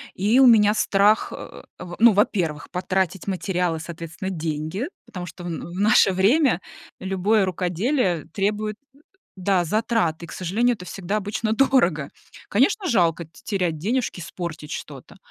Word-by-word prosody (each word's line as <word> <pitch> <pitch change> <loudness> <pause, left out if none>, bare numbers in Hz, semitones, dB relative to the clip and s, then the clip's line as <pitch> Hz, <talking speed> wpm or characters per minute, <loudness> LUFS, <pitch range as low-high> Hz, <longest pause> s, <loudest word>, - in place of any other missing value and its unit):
и 215 +7 +3
у 265 - +8
меня 210 -3 +6
страх, 205 0 +2
э, - - -10 0.2
в 175 -1 -7
ну, 235 0 +7
во-первых, 180 - 0
потратить 190 0 -1
материал 180 -3 -1
и, - - -5
соответственно, 170 +3 -6
деньги, 160 - -3 0.2
потому 180 -2 -7
что 175 0 -10
в - - -4
на 165 +1 -6
в 180 - -7 0.2
наше - - +5
время 210 - +3 0.4
любое 195 +2 +1
рукоделие 185 - -1
требует, 210 +1 -1 0.2
э, - - -22 0.4
да, 185 -1 +1
затрат, 215 -3 0
и, 170 - -6
к - - -11
сожалению, 220 +7 0
это 180 - -11
всегда 195 +3 -3
обычно 215 +2 -2
дорого. 185 - +2 0.4
Конечно, 370 - +2
жалко 170 - +2
те 160 - -19
терять 180 -6 -1
денежки, 220 +2 -2
испортить 160 -3 -6
что-то. - - -8
190 Hz, 155 wpm, -23 LUFS, 175-215 Hz, 0.4 s, у